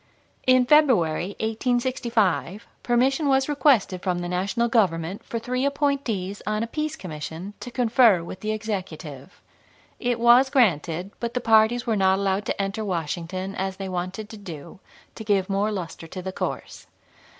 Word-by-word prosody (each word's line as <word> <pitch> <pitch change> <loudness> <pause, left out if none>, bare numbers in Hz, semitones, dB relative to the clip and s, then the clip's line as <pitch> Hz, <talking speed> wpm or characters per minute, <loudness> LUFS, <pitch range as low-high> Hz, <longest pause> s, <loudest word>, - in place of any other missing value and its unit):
In 255 -1 +5
February, 205 - +3
1865, 225 -4 0 0.2
permission 265 +5 +2
was 265 -1 +3
requested 270 -11 +2
from 180 -2 -1
the 175 0 -4
National 195 +6 0
Government 185 -5 0
for 230 - -5
three 250 +3 -2
appointees 275 -9 -1
on 215 +1 0
a - - 0
peace 305 +6 -3
commission 165 - -7
to - - -7
confer 235 -6 +4
with 180 - -8
the 215 +2 -2
Executive. 185 -8 -6 0.6
It 245 -1 -1
was 240 +3 +6
granted, 180 - +1
but 235 0 -4
the - - +2
parties 225 +1 +3
were 230 -3 +1
not 190 -1 +3
allowed 195 +1 -1
to - - -2
enter 195 +2 -2
Washington, 185 +1 -3
as 190 0 -3
they 195 - -5
wanted 185 +4 -4
to 220 - -9
do, 170 -6 -10 0.3
to 220 - -8
give 200 -2 +1
more 200 +2 +1
luster 175 -4 -6
to 185 +3 -7
the 190 - -4
course. - - -5
210 Hz, 160 wpm, -24 LUFS, 185-240 Hz, 0.6 s, was